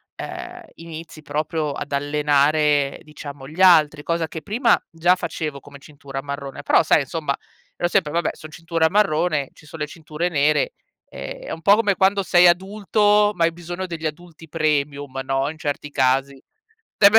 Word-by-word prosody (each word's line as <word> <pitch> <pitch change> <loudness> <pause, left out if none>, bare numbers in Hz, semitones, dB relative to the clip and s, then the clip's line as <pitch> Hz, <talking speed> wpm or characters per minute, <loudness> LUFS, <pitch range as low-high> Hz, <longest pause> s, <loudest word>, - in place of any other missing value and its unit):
ehm, 360 0 -7
inizi 165 -1 -10
proprio 150 +1 -2
ad 145 - -6
allenare, 145 0 +2
diciamo, 145 -3 -10
gli 160 +6 -5
altri, 155 -5 +5
cosa 165 -1 -1
che 160 - -7
prima 230 - +2
già 175 +2 +3
facevo 155 -5 -4
come 140 - -13
cintura 140 -2 -8
marrone. 140 0 -6
Però, - - +4
sai, 155 - +4
insomma, 140 0 -2 0.4
ero 175 - 0
sempre: 150 -3 +1
"Vabbè, 170 -1 +1
son 155 0 -12
cintura 165 0 0
marrone, 160 -7 +1
ci - - -19
son 165 - -10
le 150 - -2
cinture 160 +2 -4
nere". 150 - +2 0.4
Ehm, - - -7
è - - -5
un 165 - -6
po' 200 +4 +6
come 205 -3 +1
quando 195 +1 +2
sei 180 -1 +6
adulto, 205 +3 +3
ma 170 - +1
hai 165 - +1
bisogno 175 +2 -6
degli 165 -2 -6
adulti 165 +1 -7
premium 145 -3 -1
no, 135 +1 0
in 155 - -8
certi 145 -1 -4
casi. 135 +1 +1 0.6
Eh 200 - +9
beh 225 - +8
155 Hz, 175 wpm, -22 LUFS, 145-175 Hz, 0.6 s, Eh